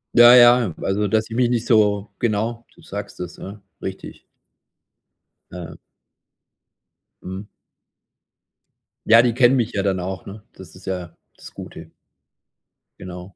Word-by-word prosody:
Ja, 120 +1 +9
ja, 120 -6 +6
also 100 +2 -1
dass 110 +3 0
ich 115 - -6
mich 125 -1 +2
nicht 120 -1 -1
so 105 -3 +2
genau, 115 +1 -2
du - - -20
sagst 100 -2 -8
es, 90 -1 -7
ja, 100 +2 -10 0.2
richtig. 95 0 -8 1.3
Ja. 85 -3 -9 1.5
Mhm. 95 +3 -7 1.6
Ja, 115 +1 +7
die 120 -2 +1
kennen 125 +1 +4
mich 115 -1 -1
ja 100 - -1
dann 95 -1 -1
auch, 95 +2 -6
ne, 105 +2 -10
das 90 -3 -14
ist 90 - -15
ja 90 -2 -5 0.2
das - - -14
Gute. - - -11 1.1
Genau. 90 +1 -10
105 Hz, 135 wpm, -21 LUFS, 95-115 Hz, 1.6 s, Ja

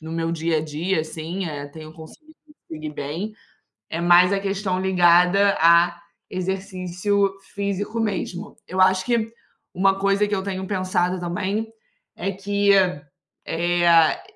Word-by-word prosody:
no 160 +1 -8
meu 165 0 -2
dia 165 -1 0
a - - -1
dia 160 +4 -1
assim, 160 +4 -5
eh, 145 -2 -5
tenho 155 +2 -11
conseguido 165 - -14 0.4
dormir 155 -1 -6
bem, 160 +10 -5 0.6
é 165 - -3
mais 175 +2 +5
a 200 - +2
questão 195 -1 -2
ligada 180 +2 +4
a 170 +1 +4 0.3
exercício 190 +1 -1 0.2
físico, 200 +2 -3
mesmo. 205 -2 -3
Eu 185 0 -3
acho 185 0 +4
que 230 -2 0 0.4
uma 195 +1 +2
coisa 200 +1 +2
que - - -8
eu 190 - -2
tenho 190 -1 -4
pensado 185 -2 0
também 190 +5 -2 0.5
é 195 +3 -2
que, 200 +1 +1 0.7
eh, 170 -1 +3
185 Hz, 140 wpm, -22 LUFS, 170-195 Hz, 0.7 s, mais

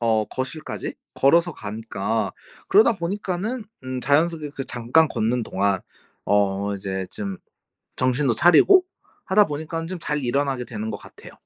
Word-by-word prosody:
어 110 -2 +2
거실까지 130 +7 -5 0.2
걸어서 170 +5 +4
가니까 110 -1 -3 0.4
그러다 220 +3 +6
보니까는 200 +5 -3 0.2
음 130 0 -4
자연스럽게 155 +2 +1
그 135 - -3
잠깐 125 +8 +2
걷는 120 0 0
동안 100 -1 0 0.4
어 100 0 +1
이제 95 -1 -4
좀 100 -2 -4 0.6
정신도 130 -1 +2
차리고 365 - +6 0.4
하다 205 +1 +5
보니깐 160 +2 -4
좀 185 0 -4
잘 150 -2 -2
일어나게 135 0 0
되는 110 -2 -5
것 - - -4
같아요. - - -14
130 Hz, 305 characters per minute, -23 LUFS, 110-165 Hz, 0.6 s, 그러다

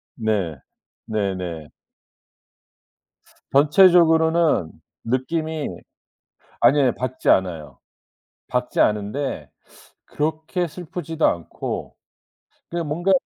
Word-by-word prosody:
네. 105 -9 -1 0.5
네네. 90 -7 -3 1.8
전체적으로는 160 - +4 0.3
느낌이 155 +6 -2 0.9
아니에요 130 +1 +4
밝지 130 0 -2
않아요. 80 -8 +1 0.7
밝지 125 0 -2
않은데 105 +7 -1 0.6
그렇게 160 +4 -2
슬프지도 165 -1 -4
않고 85 -1 -4 0.7
그냥 170 -2 -3
뭔가 175 +6 0
140 Hz, 175 characters per minute, -22 LUFS, 100-160 Hz, 1.8 s, 전체적으로는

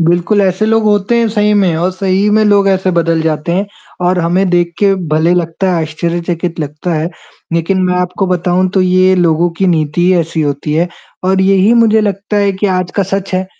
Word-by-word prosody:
बिल्कुल 175 +5 +1
ऐसे 190 +2 0
लोग 225 0 +2
होते 210 +2 +1
हैं 230 - +2
सही 210 -1 +1
में 190 -5 +2
और 175 +3 0
सही 190 +2 0
में 215 +1 +3
लोग 200 -1 +3
ऐसे 190 -1 +1
बदल 165 -2 0
जाते 160 +1 -2
हैं 195 +4 -1 0.4
और 180 0 +1
हमें 175 +3 +1
देख 175 -1 +1
के 200 -1 +3
भले 160 +3 +2
लगता 175 +2 -1
है 170 -2 0
आश्चर्यचकित 170 +1 -3
लगता 150 +4 -4
है 160 +2 -2 0.4
लेकिन 170 +3 0
मैं 180 - 0
आपको 180 +2 -1
बताऊँ 180 +1 0
तो 190 - +3
ये 185 +1 +3
लोगों 170 -1 +1
की 195 - +1
नीति 160 -2 0
ही 185 - +3
ऐसी 165 0 -3
होती 145 +1 -3
है 170 +3 +1 0.4
और 190 +1 +1
यही 195 +2 +3
मुझे 220 -1 +3
लगता 200 0 -2
है 200 -1 +2
कि - - +3
आज 180 -1 -3
का 200 - +2
सच 195 -1 -2
है 185 0 -1
180 Hz, 210 wpm, -13 LUFS, 170-195 Hz, 0.4 s, में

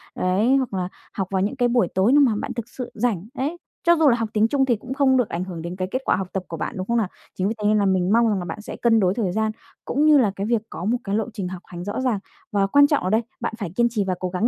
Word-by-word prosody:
đấy, 200 +8 +2
hoặc 260 -5 -2
là 185 -1 -2 0.2
học 195 -2 -2
vào 190 -1 +1
những 205 +7 -1
cái 245 -2 +2
buổi 240 -7 +2
tối 190 +5 +4
nếu 290 +2 +6
mà 265 -4 +5
bạn 230 +4 -4
thực 235 -1 -6
sự 250 -1 -7
rảnh, 215 -5 -1
đấy. 290 +5 -2 0.3
Cho 345 -1 +5
dù 315 -3 +5
là 240 - +4
học 225 -2 -2
tiếng 215 +1 +3
Trung 270 +2 +2
thì 245 -3 +2
cũng 250 +5 -7
không 270 -1 +3
được 245 -4 +1
ảnh 170 +2 -2
hưởng 180 -3 -6
đến 170 +2 -5
cái 185 0 -3
kết 260 - -1
quả - - +3
học 190 0 -3
tập 190 - -2
của 165 - -6
bạn, - - -4
đúng 185 0 -4
không 235 - +1
nào? 220 -4 +1 0.3
Chính 185 - 0
vì 215 - 0
thế 205 - +1
nên 215 0 +4
là 205 - +2
mình 190 -1 +2
mong 230 0 +4
rằng 205 -3 0
là 175 - -5
bạn 175 +5 -6
sẽ - - -7
cân 230 -2 +4
đối 185 -3 +2
thời 205 -5 -1
gian 220 +3 0 0.3
cũng 290 +4 +1
như 305 -1 +7
là 230 -7 +3
cái 200 - -3
việc 230 -2 +1
có 175 - -6
một 235 +4 +2
cái 200 0 -2
lộ 220 0 +1
trình 195 -3 -4
học 180 -1 -7
hành 175 -1 -8
rõ 205 +6 -3
ràng, 250 -6 0 0.3
và 200 -1 +2
quan 285 +7 +6
trọng 290 - +1
ở 185 - 0
đây, 220 +3 +3 0.2
bạn - - -3
phải 200 -6 -4
kiên 235 +1 +4
trì 220 -3 -1
và 185 - 0
cố 185 - -2
gắng 185 +5 +1
215 Hz, 330 wpm, -23 LUFS, 190-245 Hz, 0.3 s, như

